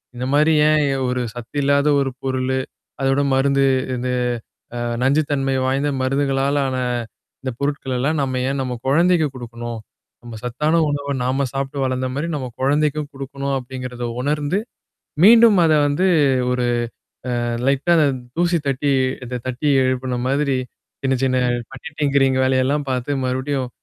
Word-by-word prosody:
இந்த 125 +1 -4
மாரி 150 +2 +4 0.2
"ஏன் 155 -1 +3 0.2
ஒரு 125 0 -1
சத்து 120 +2 -10
இல்லாத 140 +1 +2
ஒரு 135 -1 +1
பொருளு. 130 0 -1 0.4
அதோட 135 +1 +2 0.2
மருந்து 140 +1 +2 0.3
இந்த 125 +1 -3 0.7
அ - - -3 0.2
நஞ்சு 140 +4 +3
தன்மை 135 -1 0
வாய்ந்த 135 +2 +1
மருந்துகளால 135 +1 +1
ஆன. 130 - -2 0.6
இந்த 130 0 -3
பொருட்களெல்லாம் 140 +1 -1
நம்ம 130 -2 -1
ஏன் 140 0 -2
நம்ம 130 -1 -3
குழந்தைக்கு 165 +3 +3
குடுக்கணும்? 120 -1 -6 0.4
நம்ம 120 -2 -8
சத்தான 150 +7 +1
உணவ 145 -1 -2
நாம 130 +2 0
சாப்பிட்டு 135 +1 -3
வளந்த 130 0 -1
மாரி, 150 +4 -2
நம்ம 130 -3 -4
கொழந்தைக்கும் 150 +2 +1
குடுக்கணும்" 140 0 -4
அப்படிங்கிறத 125 -1 -6 0.2
உணர்ந்து, 150 +6 0 0.7
மீண்டும் 225 -1 +7
அத 160 - +4
வந்து 145 +6 +1 0.5
ஒரு 125 -1 0 0.8
அ - - -2 0.2
லைட்டா 140 +5 +2
அந்த 155 -2 +4 0.3
தூசி 175 0 +2
தட்டி 140 +1 +1 0.3
இத 125 0 -4
தட்டி 130 +4 -2 0.2
எழுப்புன 130 -1 -1
மாதிரி, 140 -1 +1 0.5
சின்ன 135 -1 +1
சின்ன 130 -1 +1 0.4
பட்டி 135 - -8
டிங்கிரீங் 135 -2 +3
வேலையெல்லாம் 130 +2 +1
பாத்து 125 +2 -2
மறுபடியும் 130 0 -2
135 Hz, 140 wpm, -20 LUFS, 130-145 Hz, 0.8 s, மீண்டும்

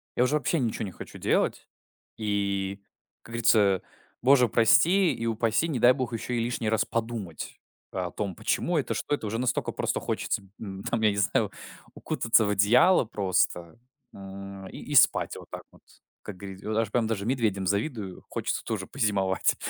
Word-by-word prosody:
я - - +1
уже 135 +4 +2
вообще 155 +2 0
ничего 115 -3 -1
не 95 - -6
хочу - - -10
делать. - - 0 0.5
И, 100 -2 -1 0.4
как 115 - -13
говорится, 110 -5 +3 0.4
боже, 125 0 +5
прости 170 - +4
и 115 - -4
упаси, 115 +6 +1
не 135 -7 -2
дай 125 +2 +7
бог, 125 -2 -3
ещё 115 +2 -4
и 120 - 0
лишний 115 -2 -2
раз 110 -1 +2
подумать 115 -8 -4 0.3
о 90 -2 -3
том, 100 -4 -4
почему 175 - 0
это, 145 - -1
что 145 - -1
это. 130 - -8
Уже 115 +2 -2
настолько 125 0 -1
просто - - -1
хочется, 100 - -2 0.2
м, 95 -2 -7
там, 115 - -1
я 110 - +5
не 100 - -4
знаю, 100 - +1 0.4
укутаться 115 -1 +2
в 105 - 0
одеяло 115 - +5
просто, 95 -2 -1 0.3
м, 95 0 -9
и - - -10
и - - -7
спать - - +4
вот - - -11
так - - -7
вот. - - -21 0.4
Как 100 -3 -8
говорит 95 0 -9
и - - -7
вот 110 - -1
аж 110 -2 0
прям 115 -1 +1
даже 105 -3 -2
медведям 110 -6 0
завидую. 100 - -2
Хочется - - -2
тоже - - -3
позимовать. 95 -2 +1
110 Hz, 185 wpm, -27 LUFS, 100-120 Hz, 0.5 s, дай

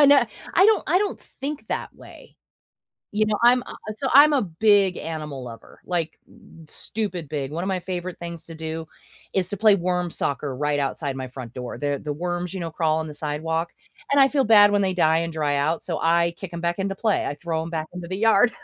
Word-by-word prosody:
I 290 - +8
know 285 0 +7 0.3
I 385 - +6
don't 440 - +4
I 360 - +4
don't 410 0 -1
think 285 +2 -7
that - - -3
way, - - -15 0.8
you 215 +1 +2
know 210 -1 0
I'm 245 +1 +6
a - - -9 0.2
so, 270 - -2
I'm 295 +2 +8
a 275 - +3
big 195 +1 +3
animal 150 -5 -5
lover, 115 -2 -11
like, 170 -3 -2 0.5
stupid 195 -7 -4
big 140 -2 -3
one 170 +3 -3
of - - -2
my 190 -1 0
favorite 180 0 -5
things 170 -1 -7
to 165 - -10
do 160 0 -5 0.5
is 185 -2 0
to 205 - -4
play 215 0 +6
worm 180 -1 -1
soccer 140 -3 -2
right 145 +2 0
outside 140 0 -2
my 130 -1 -5
front 125 -2 -9
door. 125 -1 -6
The 145 -1 -1
the 150 -1 -2
worms, 175 +2 -3
you 190 - -4
know, 165 -1 -4
crawl 155 0 +1
on 160 - -3
the 150 - -9
sidewalk, 160 +3 -2 0.4
and 280 0 +6
I 270 - +7
feel 275 -1 +1
bad 205 -2 +7
when 205 0 +3
they 190 -1 +1
die 160 -2 +3
and 165 0 -3
dry 150 -2 0
out, 155 +4 0
so 165 -3 -3
I 170 +1 +2
kick 190 -2 -8
’em 170 - -5
back 170 +1 -1
into 195 0 -1
play, 215 -1 +1
I 145 - -3
throw 160 0 -3
‘em 165 - -6
back 160 -1 -3
into 180 -1 -7
the 185 +2 -3
yard. 225 +2 +4
170 Hz, 230 wpm, -24 LUFS, 155-205 Hz, 0.8 s, I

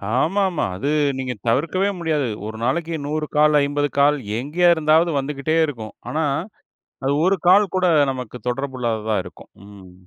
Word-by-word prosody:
ஆமாமா, 185 +4 +1
அது 140 +9 -2 0.3
நீங்க, 130 -1 -3
தவிர்க்கவே 165 +11 +1
முடியாது. 155 -5 0 0.2
ஒரு 110 - -7
நாளைக்கு 160 +6 -1
100 150 +1 -2
கால், 150 0 +4
50 145 +1 0
கால் 145 +1 +4 0.2
எங்கே 150 +8 0
இருந்தாவது 160 +2 +3
வந்துகிட்டே 140 +3 -2
இருக்கும். 115 -8 -7 0.2
ஆனா, 160 +1 -1 0.8
அது 135 - +1
1 195 +1 +2
கால் 195 0 +5
கூட, 185 -1 +2 0.3
நமக்கு 125 -2 -7
தொடர்பு 130 +1 -3
இல்லாததா 110 -2 -1
இருக்கும். - - -13 0.2
ம். 100 -3 -14
145 Hz, 150 wpm, -21 LUFS, 125-165 Hz, 0.8 s, கால்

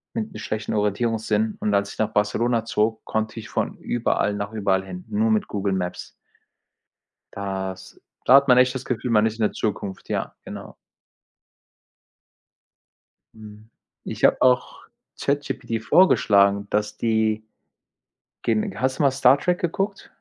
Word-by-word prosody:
mit'm 220 -3 -4
schlechten 110 0 -4
Orientierungssinn 110 +1 0
und 105 - -1
als 100 0 +1
ich - - -18
nach 110 - +1
Barcelona 115 +3 +1
zog, 110 0 0
konnte 110 +1 -2
ich 110 - -10
von - - -2
überall 115 -3 0
nach 100 +1 -4
überall 100 -3 +1
hin, 90 -1 -8
nur 220 +2 +1
mit 215 -1 +1
Google 100 -1 -2
Maps. 90 -2 -4 1.2
Das 95 -1 -5 0.3
da 130 - +7
hat 140 0 +6
man 125 -2 +6
echt 125 +1 +3
das 130 - -5
Gefühl, 125 0 -3
man 105 -1 +4
ist 110 -1 -1
in 115 - -7
der - - +1
Zukunft, 100 -2 -4
ja, - - -3
genau. - - -9 2.6
Mhm. 110 0 -13 0.3
Ich - - -7
habe - - +3
auch 125 -1 +2 0.4
ChatGPT 130 -5 -2
vorgeschlagen, 100 - +4
dass 105 0 -1
die 110 -1 +1 1.0
gen 110 -2 -1
hast 130 +1 0
du - - +1
mal 140 - +5
Star 135 0 +4
Trek 180 +2 0
geguckt? 195 +3 -2
110 Hz, 145 wpm, -23 LUFS, 105-125 Hz, 2.6 s, da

